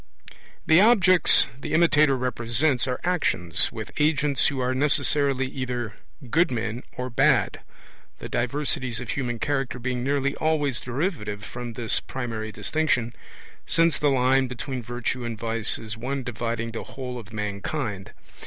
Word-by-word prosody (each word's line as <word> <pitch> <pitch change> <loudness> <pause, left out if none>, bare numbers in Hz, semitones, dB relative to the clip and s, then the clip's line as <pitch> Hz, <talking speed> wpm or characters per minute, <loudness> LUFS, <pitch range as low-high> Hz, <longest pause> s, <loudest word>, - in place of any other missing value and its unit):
The 160 +3 +6
objects 190 -6 +6
the - - -5
imitator 150 -4 +4
represents 125 +2 +1
are 125 - -2
actions, 155 - +2
with - - -7
agents 150 -2 +2
who 140 -2 -2
are 125 0 0
necessarily 140 -1 +2
either 125 -4 -4 0.4
good 170 +1 +4
men 115 -1 -3 0.2
or 125 0 -4
bad 115 - +3 0.6
the - - -7
diversities 125 -1 -1
of 125 -3 -4
human 120 -4 -2
character 135 -1 -1
being 125 0 -3
nearly 140 +1 0
always 150 -5 0
derivative 120 - -3
from 120 -1 -6
this 115 -2 +1
primary 115 -4 -5
distinction, 125 -1 0 0.5
since 165 -2 +2
the 145 - +3
line 130 0 +3
between 125 +1 -5
virtue 120 +1 -3
and 115 -1 -4
vice 115 -1 -1
is 110 0 -7
one 130 +4 -3
dividing 115 -1 -3
the 115 - -5
whole 125 -2 -6
of 110 -1 -12
mankind. 105 0 -4
125 Hz, 145 wpm, -25 LUFS, 115-145 Hz, 0.6 s, The